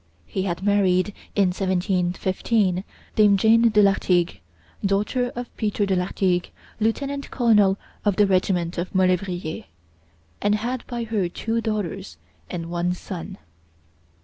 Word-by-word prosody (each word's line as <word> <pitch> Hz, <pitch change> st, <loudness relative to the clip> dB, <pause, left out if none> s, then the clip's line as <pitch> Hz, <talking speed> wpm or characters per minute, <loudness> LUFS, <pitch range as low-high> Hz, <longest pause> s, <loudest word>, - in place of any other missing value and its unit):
He 190 Hz, -, -3 dB
had 185 Hz, -1 st, -3 dB
married, 200 Hz, -1 st, +2 dB, 0.2 s
in 200 Hz, -3 st, +4 dB
1715, 185 Hz, +1 st, 0 dB, 0.3 s
dame 205 Hz, -2 st, +5 dB
Jane 230 Hz, +3 st, +5 dB
de 210 Hz, -1 st, +4 dB
Lartigue, 180 Hz, -3 st, +2 dB, 0.4 s
daughter 210 Hz, +5 st, 0 dB
of 245 Hz, 0 st, -7 dB
Peter 210 Hz, -1 st, 0 dB
de 195 Hz, -1 st, +1 dB
Lartigue, 180 Hz, 0 st, 0 dB, 0.3 s
lieutenant 275 Hz, +6 st, -1 dB
colonel 210 Hz, -6 st, +3 dB, 0.3 s
of 205 Hz, -3 st, +2 dB
the 210 Hz, -, +5 dB
regiment 185 Hz, -3 st, +1 dB
of 185 Hz, +2 st, -4 dB
Molevrier, 185 Hz, -3 st, 0 dB, 0.8 s
and 205 Hz, +1 st, +3 dB
had 240 Hz, +4 st, -3 dB
by 240 Hz, -2 st, -3 dB
her 215 Hz, -6 st, -1 dB
two 225 Hz, +5 st, -2 dB
daughters 205 Hz, -4 st, -3 dB, 0.3 s
and 170 Hz, -2 st, -5 dB
one 175 Hz, +1 st, 0 dB
son. 180 Hz, -2 st, -7 dB
195 Hz, 125 wpm, -23 LUFS, 180-215 Hz, 0.8 s, dame